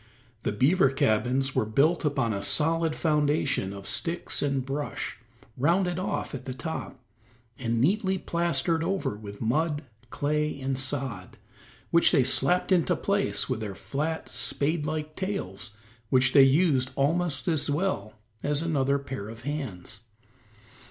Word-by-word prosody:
The - - -1
beaver 135 - +3
cabins 135 0 +1
were - - +2
built 140 +12 +2
upon 135 -7 0
a 100 - -3
solid 160 +7 +2
foundation 150 - +1
of 100 -1 -9
sticks 170 +1 -1
and 135 -3 0
brush, 140 +2 -4 0.4
rounded 175 +6 +1
off 185 - -3
at 130 -2 -6
the 130 - -5
top, 160 -3 -5 0.6
and 115 -2 -1
neatly 190 - +2
plastered 170 -2 0
over 190 - -1
with 105 -1 -10
mud, 150 +6 0 0.3
clay 150 +1 -1
and 135 0 -1
sod, 135 -2 -2 0.5
which 170 - +5
they 140 -7 +4
slapped 135 +9 +3
into 180 -1 +3
place 200 +4 0
with 130 -4 -2
their 105 -3 -5
flat, 155 +9 -3
spade 150 +1 -1
like 155 0 -4
tails, 190 - -4 0.4
which 130 +2 +3
they 140 - +8
use 135 -1 +4
almost 145 -1 0
as 155 -3 +1
well 145 - -1 0.3
as 145 +2 0
another 140 -4 +1
pair 135 -7 -6
of 115 +1 -10
hands. 125 -9 -5
145 Hz, 140 wpm, -27 LUFS, 130-165 Hz, 0.6 s, they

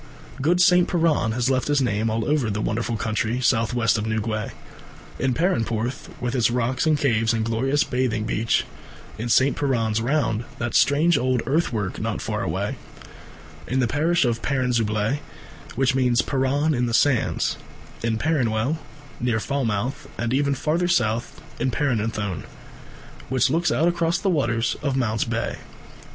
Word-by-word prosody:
Good 170 +6 +2
St. 180 -1 +5
Piran 160 -10 +1
has 125 +2 +1
left 130 -1 0
his 145 -1 +2
name 115 -3 0
all 110 0 -1
over 145 -6 +1
the 105 0 -2
wonderful 115 +1 -1
country 110 +2 -1
south 120 -1 +1
west 115 -2 +2
of 105 - -3
Newquay. 110 -1 -2 0.7
In 130 -2 +1
Perranporth, 120 - -1
with 120 0 -2
its 120 -3 +2
rocks 125 +5 0
and 155 -1 +3
caves 115 -5 +2
and 110 -1 0
glorious 130 +6 +1
bathing 125 -4 -1
beach; 110 +1 0 0.5
in 120 +2 -3
St. 130 +4 +4
Piran's 115 -6 0
Round, 120 -3 0
that 120 0 -3
strange 155 +4 +4
old 125 -1 0
earth 160 +5 +1
work 105 -5 -3
not - - -2
far - - -3
away; - - -2 0.9
in 130 - 0
the 130 - +3
parish 155 +5 +2
of 115 -1 0
Perranzabuloe, 120 -2 0 0.6
which 135 +1 +2
means 125 -2 +2
Perran 140 +3 +1
in 125 -2 0
the 115 - 0
Sands; 135 -3 +1 0.4
in 115 -1 0
Perranwell, 130 0 0 0.4
near 120 -2 0
Falmouth, 130 +2 -2
and 120 +1 -1
even 140 +1 +1
further 160 +6 0
south 120 -8 0 0.2
in 130 - +1
Perranuthnoe, 110 - -1 0.9
which 130 0 +2
looks 165 +2 +1
out 165 - +2
across 170 0 +1
the 195 - 0
waters 115 -7 0
of 140 -3 -1
Mounts 110 -4 0
Bay. 115 -1 -2
125 Hz, 160 wpm, -23 LUFS, 115-140 Hz, 0.9 s, St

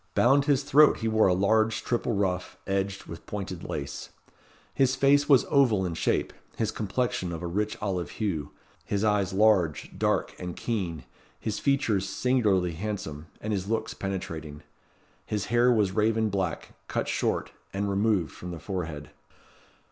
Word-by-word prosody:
Bound 135 +3 +4
his 140 -2 +2
throat 150 +2 +6
he 115 - 0
wore 110 -1 +4
a 90 - +4
large, 110 +3 +2
triple 120 -1 -1
ruff, 90 -2 -1
edged 95 0 -1
with 85 - -10
pointed 95 -4 -5
lace. 70 +1 -5 0.6
His 135 -1 +2
face 140 +2 +4
was 135 -4 +6
oval 120 -9 +3
in 85 - -2
shape, 80 - 0 0.2
his 110 -1 0
complexion 105 -4 -2
of 85 +1 -5
a - - -2
rich 105 +5 -1
olive 95 -4 -2
hue, 90 -10 -2 0.3
his 100 0 -1
eyes 105 -3 +2
large, 95 -7 +2
dark, - - 0
and 90 -1 -5
keen, 90 - -3 0.4
his 110 -1 -3
features 110 -9 +1
singularly 100 -6 +2
handsome, 80 -4 -5
and 105 0 -2
his 95 -1 -2
looks 110 0 -1
penetrating. 80 -6 -5 0.6
His 105 -3 -2
hair 120 +1 +5
was 105 -5 +2
raven 110 +1 +2
black, 95 -5 -2 0.2
cut - - -2
short, - - -1 0.2
and 100 +1 -2
removed 100 -3 +1
from 90 - -8
the 85 -2 -6
forehead. 80 -5 -5
100 Hz, 155 wpm, -27 LUFS, 90-110 Hz, 0.6 s, throat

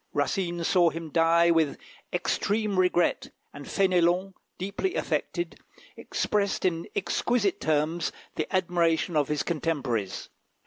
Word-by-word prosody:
Racine 175 -4 -1
saw 175 0 +4
him 165 -1 -7
die 170 +1 +4
with 160 -4 +2 0.3
extreme 205 -2 0
regret, 180 -1 +2 0.2
and 140 0 -9
Fénélon, 185 0 +2 0.2
deeply 200 - -2
affected, 345 - -2 0.4
expressed 200 -2 -1
in 170 -2 0
exquisite 225 -6 0
terms 155 +2 0 0.2
the 155 - -3
admiration 175 -3 +1
of 145 -2 +2
his 150 -1 -1
contemporaries. 135 - -2
170 Hz, 115 wpm, -27 LUFS, 160-190 Hz, 0.4 s, saw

